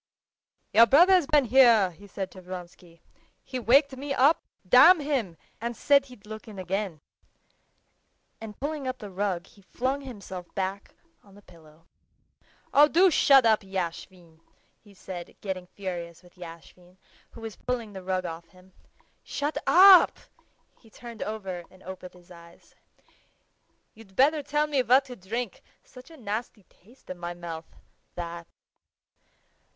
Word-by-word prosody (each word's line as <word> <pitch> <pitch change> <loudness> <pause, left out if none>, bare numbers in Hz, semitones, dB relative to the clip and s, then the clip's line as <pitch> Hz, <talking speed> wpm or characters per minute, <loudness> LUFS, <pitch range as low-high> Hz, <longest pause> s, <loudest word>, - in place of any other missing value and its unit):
"Your 230 +2 +7
brother's 350 - +5
been 300 -4 +3
here," 230 -6 +5
he 200 +5 -16
said 190 -1 -6
to 185 - -13
Vronsky. 175 -2 -11 0.4
"He 255 - -5
waked 270 +4 +3
me 275 +1 -4
up, 285 +6 +4 0.3
damn 325 - +7
him, 260 - -2 0.2
and 235 -1 -4
said 280 -1 +3
he'd 250 -6 -16
look 215 +1 -10
in 210 -2 -11
again." 185 -3 -4 1.4
And 215 -2 -10
pulling 290 -1 -4
up 255 0 -3
the 205 -4 -10
rug 190 -2 -2
he 200 - -21
flung 260 +8 -3
himself 200 -9 -9
back 195 0 -4 0.3
on 200 -1 -20
the 205 - -17
pillow. 165 -2 -20 0.9
"Oh, 295 +1 +7
do 360 +4 +4
shut 275 -4 +5
up, 220 -1 +4
Yashvin!" 180 -3 -7 0.4
he 205 -2 -20
said, 180 -2 -9
getting 185 -3 -5
furious 175 -3 -7
with 175 - -20
Yashvin, 175 +1 -14 0.4
who 230 - -12
was 225 -2 -7
pulling 235 -4 -4
the 190 - -8
rug 185 0 -2
off 165 0 -7
him. 185 +2 -22 0.5
"Shut 290 +2 -4
up!" 375 0 +7 0.6
He 225 - -21
turned 235 0 -11
over 195 -5 -5
and 185 0 -20
opened 185 -1 -10
his 180 0 -20
eyes. 170 0 -17 1.2
"You'd 210 -3 -17
better 295 +5 +3
tell 295 +1 0
me 290 -3 0
what 255 +3 +4
to 250 -2 -9
drink; 225 +3 -5 0.2
such 250 +3 -15
a 325 - -14
nasty 215 -2 -5
taste 220 +5 -17
in 180 - -8
my 175 0 -6
mouth, 165 -2 -9 0.4
that...." 170 -1 -7
205 Hz, 150 wpm, -26 LUFS, 180-255 Hz, 1.4 s, Your